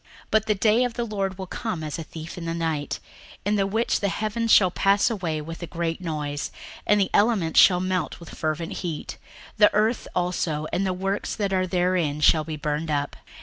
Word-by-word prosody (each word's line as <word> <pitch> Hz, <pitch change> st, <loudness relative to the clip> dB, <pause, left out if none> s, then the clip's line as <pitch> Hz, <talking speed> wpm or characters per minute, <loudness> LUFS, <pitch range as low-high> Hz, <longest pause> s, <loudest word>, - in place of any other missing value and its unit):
61:003:010 -, -, -28 dB, 0.2 s
But 220 Hz, 0 st, +3 dB
the 210 Hz, -, +2 dB
day 220 Hz, +4 st, +3 dB
of 245 Hz, -2 st, -1 dB
the 240 Hz, -, -1 dB
Lord 195 Hz, -4 st, -2 dB
will 190 Hz, -, -5 dB
come 185 Hz, -3 st, -4 dB
as 155 Hz, +1 st, -4 dB
a -, -, -4 dB
thief 160 Hz, +1 st, -8 dB
in 175 Hz, -, -6 dB
the 165 Hz, 0 st, -2 dB
night; 160 Hz, -3 st, -2 dB, 0.5 s
in 205 Hz, +1 st, +2 dB
the 195 Hz, -1 st, +1 dB
which 220 Hz, +4 st, +1 dB
the 200 Hz, -, 0 dB
heavens 215 Hz, +3 st, -1 dB
shall 185 Hz, -3 st, +6 dB
pass 200 Hz, +5 st, +3 dB
away 170 Hz, -8 st, -2 dB
with 165 Hz, +3 st, -8 dB
a 170 Hz, -, -5 dB
great 165 Hz, +1 st, -3 dB
noise, 150 Hz, -4 st, -3 dB, 0.4 s
and 210 Hz, 0 st, +4 dB
the 195 Hz, -, +1 dB
elements 205 Hz, -7 st, +3 dB
shall 180 Hz, -2 st, +7 dB
melt 185 Hz, 0 st, -2 dB
with 170 Hz, -, -11 dB
fervent 155 Hz, +1 st, -3 dB
heat, 165 Hz, -4 st, -5 dB, 0.4 s
the 210 Hz, -1 st, +6 dB
earth 220 Hz, +3 st, +1 dB
also 175 Hz, -4 st, -1 dB
and 195 Hz, +1 st, +1 dB
the -, -, +1 dB
works 195 Hz, +2 st, -2 dB
that 200 Hz, -2 st, -1 dB
are 185 Hz, 0 st, +1 dB
therein 175 Hz, -5 st, +1 dB
shall 155 Hz, +1 st, +5 dB
be 155 Hz, 0 st, -5 dB
burned 150 Hz, +1 st, -2 dB
up. 145 Hz, -1 st, -1 dB
180 Hz, 215 wpm, -25 LUFS, 160-205 Hz, 0.5 s, shall